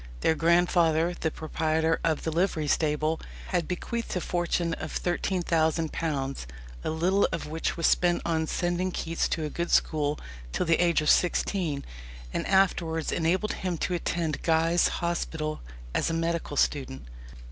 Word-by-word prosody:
Their -, -, +4 dB
grandfather, 170 Hz, 0 st, +3 dB
the 160 Hz, -, -1 dB
proprietor 160 Hz, +1 st, 0 dB
of 160 Hz, -2 st, 0 dB
the 160 Hz, -, -1 dB
livery 165 Hz, -2 st, 0 dB
stable, 155 Hz, +1 st, +1 dB, 0.3 s
had 175 Hz, -4 st, 0 dB
bequeathed 230 Hz, +6 st, -3 dB
a -, -, +1 dB
fortune 175 Hz, -1 st, -1 dB
of 155 Hz, -, -5 dB
£13,000, 160 Hz, -, 0 dB, 0.4 s
a -, -, -1 dB
little 180 Hz, +5 st, +2 dB
of 165 Hz, -, -3 dB
which 160 Hz, +3 st, -2 dB
was 165 Hz, -, 0 dB
spent 175 Hz, -1 st, +3 dB
on 160 Hz, -1 st, 0 dB
sending 175 Hz, +2 st, 0 dB
Keats 165 Hz, -1 st, -1 dB
to 160 Hz, -, -2 dB
a -, -, -3 dB
good 170 Hz, 0 st, -2 dB
school 150 Hz, -1 st, +2 dB, 0.3 s
till -, -, 0 dB
the 165 Hz, +1 st, +3 dB
age 170 Hz, -2 st, +3 dB
of 150 Hz, -, +2 dB
sixteen, 175 Hz, -5 st, +1 dB, 0.5 s
and -, -, -2 dB
afterwards 170 Hz, -4 st, +2 dB
enabled 175 Hz, +6 st, +1 dB
him 180 Hz, -2 st, -3 dB
to 180 Hz, -, -1 dB
attend 165 Hz, -3 st, -1 dB
Guy's 165 Hz, +1 st, +3 dB, 0.2 s
Hospital 160 Hz, -3 st, -2 dB, 0.3 s
as -, -, +1 dB
a -, -, -1 dB
medical 165 Hz, -3 st, -2 dB
student. 130 Hz, -, 0 dB
165 Hz, 150 wpm, -27 LUFS, 160-175 Hz, 0.5 s, Their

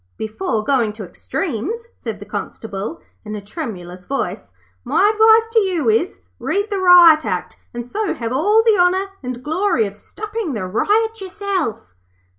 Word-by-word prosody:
'Before 220 Hz, -, -2 dB
going 235 Hz, -4 st, +1 dB
to 215 Hz, 0 st, -8 dB
extremes,' 370 Hz, -, -4 dB
said -, -, -6 dB
the -, -, -9 dB
Constable, 215 Hz, +8 st, -5 dB, 0.2 s
in 215 Hz, -1 st, -6 dB
a -, -, -4 dB
tremulous 195 Hz, -, -7 dB
voice, 190 Hz, -, -3 dB, 0.3 s
'my 415 Hz, +2 st, +3 dB
advice 445 Hz, +1 st, +5 dB
to 455 Hz, -, +6 dB
you 350 Hz, -, +1 dB
is, 230 Hz, +12 st, 0 dB, 0.2 s
read 405 Hz, +2 st, -1 dB
the 400 Hz, -, 0 dB
Riot 350 Hz, -4 st, +8 dB
Act, -, -, -3 dB
and 240 Hz, 0 st, -6 dB
so 410 Hz, -, -2 dB
have 230 Hz, 0 st, -4 dB
all 415 Hz, +11 st, +3 dB
the 440 Hz, -4 st, +4 dB
honour 365 Hz, +2 st, +3 dB, 0.2 s
and 250 Hz, -1 st, -6 dB
glory 315 Hz, -, +1 dB
of 200 Hz, 0 st, -6 dB
stopping 425 Hz, -, -5 dB
the 210 Hz, -5 st, -3 dB
riot 435 Hz, -, +1 dB
yourself.' 375 Hz, -, -3 dB
320 Hz, 160 wpm, -19 LUFS, -, 0.3 s, Riot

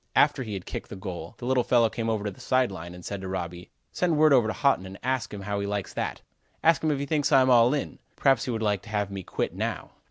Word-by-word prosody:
After 145 Hz, -2 st, +4 dB
he 110 Hz, -5 st, -4 dB
had 95 Hz, -, -6 dB
kicked -, -, -6 dB
the -, -, -7 dB
goal, 90 Hz, -4 st, -7 dB
the 120 Hz, -, -7 dB
little 125 Hz, -1 st, +2 dB
fellow 120 Hz, -2 st, +4 dB
came 115 Hz, 0 st, -3 dB
over 110 Hz, -2 st, -1 dB
to 105 Hz, -, -2 dB
the 95 Hz, -, -15 dB
side 130 Hz, -3 st, +1 dB
line, 85 Hz, -1 st, -8 dB
and 90 Hz, -, -11 dB
said 100 Hz, -1 st, -4 dB
to 95 Hz, -, -5 dB
Robby: 90 Hz, -1 st, -5 dB, 0.2 s
"Send 170 Hz, -4 st, +1 dB
word 155 Hz, -1 st, +6 dB
over 120 Hz, -5 st, +5 dB
to 110 Hz, -, -1 dB
Haughton 135 Hz, -10 st, +1 dB
and 95 Hz, +1 st, -9 dB
ask 130 Hz, -1 st, -1 dB
him 105 Hz, -, -6 dB
how 100 Hz, +1 st, -2 dB
he 100 Hz, -, -2 dB
likes 100 Hz, -1 st, -3 dB
that. -, -, -3 dB, 0.4 s
Ask 165 Hz, -2 st, +4 dB
him 155 Hz, -, +2 dB
if 145 Hz, -, +1 dB
he 140 Hz, -, -2 dB
thinks 145 Hz, -1 st, 0 dB
I'm 130 Hz, -1 st, +5 dB
all 120 Hz, 0 st, +6 dB
in? 145 Hz, -, -4 dB, 0.2 s
Perhaps 135 Hz, -4 st, +3 dB
he -, -, -4 dB
would 110 Hz, -2 st, -2 dB
like 105 Hz, -3 st, +1 dB
to 110 Hz, -, -13 dB
have 105 Hz, -2 st, -1 dB
me 100 Hz, -1 st, -5 dB
quit -, -, -3 dB
now." -, -, -3 dB
110 Hz, 285 wpm, -27 LUFS, 95-130 Hz, 0.4 s, word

